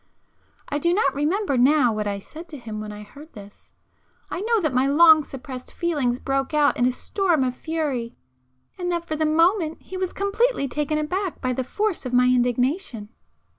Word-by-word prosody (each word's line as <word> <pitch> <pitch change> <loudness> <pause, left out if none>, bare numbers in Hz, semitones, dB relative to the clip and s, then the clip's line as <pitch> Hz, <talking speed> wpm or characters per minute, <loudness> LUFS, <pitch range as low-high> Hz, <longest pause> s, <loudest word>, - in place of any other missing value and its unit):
I 290 - -2
do 340 +3 +2
not 280 -9 +2
remember 295 - 0
now 260 -2 +4
what 210 -1 -2
I 200 -1 -2
said 320 - -11
to 300 - -8
him 220 -4 -7
when 215 0 -6
I 210 0 -9
heard 290 +9 -14
this,—I 205 - -12
know 455 +2 +2
that 310 -8 -1
my 255 +2 +2
long 315 +2 +7
suppressed 255 -2 -9
feelings 290 -8 -1
broke 270 +3 -2
out 295 -1 +3
in 245 - +2
a - - +2
storm 340 +2 0
of 250 -1 -1
fury, 280 -7 -3 0.6
and 355 -1 -2
that 340 -1 -2
for 310 - -2
the 310 0 +1
moment 330 +1 +2
he 375 - -7
was 370 -1 -2
completely 400 - 0
taken 295 +3 -1
aback 360 +5 -2
by 255 -1 -1
the 260 - -2
force 415 - -2
of 250 -2 -5
my 250 0 +5
indignation. 250 - 0
290 Hz, 190 wpm, -23 LUFS, 250-340 Hz, 0.6 s, long